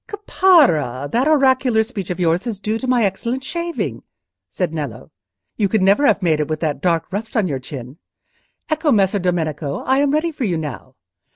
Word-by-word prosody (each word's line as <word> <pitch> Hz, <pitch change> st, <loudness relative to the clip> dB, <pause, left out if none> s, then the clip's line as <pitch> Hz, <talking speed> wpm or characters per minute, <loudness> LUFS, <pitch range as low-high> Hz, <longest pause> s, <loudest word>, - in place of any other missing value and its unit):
"Caparra, 290 Hz, -, +2 dB
that 250 Hz, +5 st, +1 dB
oracular 260 Hz, -6 st, +3 dB
speech 215 Hz, -5 st, -6 dB
of 180 Hz, -, -4 dB
yours 175 Hz, +5 st, +1 dB
is 215 Hz, -4 st, -4 dB
due 215 Hz, +3 st, -2 dB
to 260 Hz, -, -5 dB
my 245 Hz, -3 st, +3 dB
excellent 235 Hz, +7 st, -2 dB
shaving," 340 Hz, +3 st, -4 dB, 0.5 s
said 175 Hz, -4 st, -3 dB
Nello. 145 Hz, -3 st, -6 dB, 0.5 s
"You 205 Hz, -3 st, +1 dB
could 215 Hz, -2 st, +1 dB
never 200 Hz, +10 st, +4 dB
have 200 Hz, -2 st, +2 dB
made 160 Hz, -3 st, +2 dB
it 150 Hz, -, -1 dB
with 155 Hz, -1 st, -3 dB
that 155 Hz, -3 st, -2 dB
dark 170 Hz, 0 st, 0 dB
rust 220 Hz, +4 st, -3 dB
on 210 Hz, -4 st, +2 dB
your 140 Hz, -5 st, -3 dB
chin. 130 Hz, +1 st, -9 dB, 0.7 s
Ecco, 310 Hz, -1 st, +1 dB
Messer 200 Hz, -3 st, +2 dB
Domenico, 160 Hz, -5 st, -2 dB
I 265 Hz, +1 st, +2 dB
am 285 Hz, 0 st, +2 dB
ready 310 Hz, +4 st, 0 dB
for 285 Hz, -, -5 dB
you 180 Hz, -7 st, 0 dB
now. 140 Hz, -4 st, -7 dB
200 Hz, 190 wpm, -19 LUFS, 160-260 Hz, 0.7 s, never